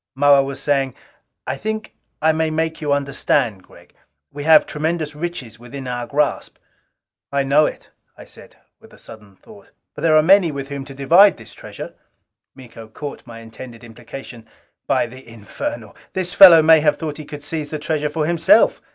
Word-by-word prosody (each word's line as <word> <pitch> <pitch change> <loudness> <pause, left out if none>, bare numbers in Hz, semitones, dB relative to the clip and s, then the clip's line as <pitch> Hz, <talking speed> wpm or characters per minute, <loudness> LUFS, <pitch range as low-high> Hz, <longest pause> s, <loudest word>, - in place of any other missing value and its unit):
Moa 140 0 +5
was 135 0 -5
saying, 135 -3 -1 0.5
"I - - -3
think 215 0 -5 0.3
I 160 - +4
may 160 0 -1
make 160 +1 -3
you 150 -2 -2
understand, 140 -6 0
Gregg. 85 -1 -20 0.4
We 145 0 -8
have 160 -1 +6
tremendous 155 0 -3
riches 150 -9 -6
within 130 +2 -9
our 120 -1 -4
grasp." 145 +2 -2 0.7
"I 140 0 0
know 145 +3 +3
it," - - -9 0.3
I - - -13
said - - -16 0.2
with - - -19
sudden 105 -3 -15
thought. 205 - -18 0.3
"But - - -10
there 155 -1 +4
are 155 - +4
many 185 -1 +4
with 140 -1 -7
whom 140 -1 -6
to 135 - -11
divide 170 +9 +5
this 115 - -13
treasure...." - - -10 0.6
Miko 115 -4 -13
caught 140 +4 -9
my 115 -1 -11
intended 115 +1 -12
implication. 120 0 -11 0.4
"By - - +1
the 130 +3 -13
infernal, 110 0 -7 0.2
this 185 -1 -3
fellow 175 -5 +9
may 160 0 +6
have 150 -1 +1
thought 155 -2 -5
he 155 - -8
could 145 -1 -10
seize 150 0 -5
this 155 -1 -6
treasure 150 -1 -1
for 155 0 -2
himself! 170 +6 +3
145 Hz, 175 wpm, -19 LUFS, 125-160 Hz, 0.7 s, fellow